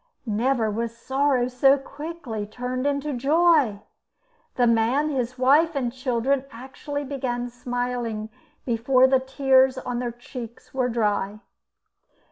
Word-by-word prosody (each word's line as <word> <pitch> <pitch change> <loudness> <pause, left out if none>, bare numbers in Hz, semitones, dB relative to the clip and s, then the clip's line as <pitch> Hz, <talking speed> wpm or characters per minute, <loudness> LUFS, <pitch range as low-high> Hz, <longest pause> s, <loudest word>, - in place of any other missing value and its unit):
Never 230 +1 +1
was 230 +2 -3
sorrow 265 0 +1
so 270 +2 +4
quickly 275 -7 -6
turned 250 +4 -3
into 285 +1 -1
joy. 285 -4 +3 0.7
The 245 - +3
man, 235 +6 +2
his 255 -3 -2
wife, 290 +6 +4
and 245 -4 -1
children, 260 +1 0
actually 275 +4 -6
began 250 -3 -3
smiling 245 -3 -3 0.4
before 250 +2 +3
the 265 0 +4
tears 265 0 +3
on 245 -2 -3
their 245 -1 -2
cheeks 240 0 -10
were 255 -2 0
dry. 210 -2 -1
255 Hz, 120 wpm, -24 LUFS, 235-275 Hz, 0.7 s, so